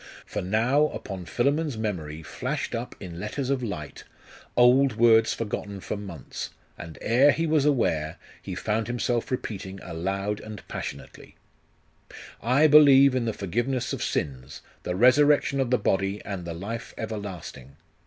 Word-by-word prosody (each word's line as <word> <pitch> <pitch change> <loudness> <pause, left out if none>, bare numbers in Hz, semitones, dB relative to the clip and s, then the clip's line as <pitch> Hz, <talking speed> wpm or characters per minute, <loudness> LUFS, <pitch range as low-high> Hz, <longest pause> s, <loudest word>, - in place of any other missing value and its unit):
For - - -4
now, 115 +10 +2
upon 95 -10 -7
Philammon's 140 - 0
memory 80 -8 -4
flashed - - -4
up 120 +2 -4
in 85 -3 -8
letters 130 +7 -3
of 135 -2 0
light, 90 -11 -6 0.5
old 125 +1 +5
words 115 -1 +5
forgotten 100 -2 -4
for - - -4
months 95 -9 -7 0.3
and 80 -2 -9
ere 130 +6 +5
he 165 - -1
was 155 -3 +2
aware, 80 - +1 0.2
he - - -6
found 110 0 -1
himself 120 0 -1
repeating 100 -6 -4
aloud 95 +5 -3
and 110 -2 -10
passionately, - - -8 1.1
'I 130 +6 +3
believe 140 -3 +7
in 125 -2 0
the 115 - 0
forgiveness 120 +7 -2
of - - -4
sins, 65 -3 -3 0.2
the 90 - -3
resurrection 140 +5 +4
of 130 -3 +1
the 125 - +3
body, 100 -1 0
and 95 -4 -5
the 85 -1 -5
life 110 +7 -6
everlasting,'.... 95 - -7
110 Hz, 145 wpm, -26 LUFS, 95-130 Hz, 1.1 s, believe